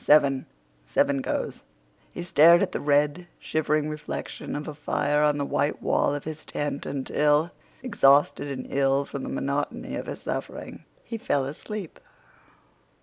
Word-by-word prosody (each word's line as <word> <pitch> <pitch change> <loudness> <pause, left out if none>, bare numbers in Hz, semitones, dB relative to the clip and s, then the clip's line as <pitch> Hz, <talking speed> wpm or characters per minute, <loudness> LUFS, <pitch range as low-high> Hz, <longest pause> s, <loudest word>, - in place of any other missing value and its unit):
"Seven." 140 -3 +4 0.4
"Seven 140 - +2
goes." - - -3 0.5
He 175 - -6
stared 170 0 +6
at - - -1
the - - -2
red, 145 +4 +1
shivering 155 -1 0
reflection 150 -1 -5
of 145 +1 -4
a 155 - -4
fire 145 0 0
on 150 -1 +3
the 140 - -1
white 145 +1 0
wall 145 - +1
of 145 - -5
his 155 0 -6
tent 145 -1 -3
until, 150 +3 +1 0.3
exhausted 145 - +4
and 135 -2 -5
ill 135 0 +2
from 140 - -6
the - - -5
monotony 140 +1 -2
of - - -5
his - - -6
suffering, - - -5 0.2
he 230 - -6
fell 140 -9 0
asleep. 180 +6 -7
145 Hz, 150 wpm, -26 LUFS, 140-155 Hz, 0.5 s, stared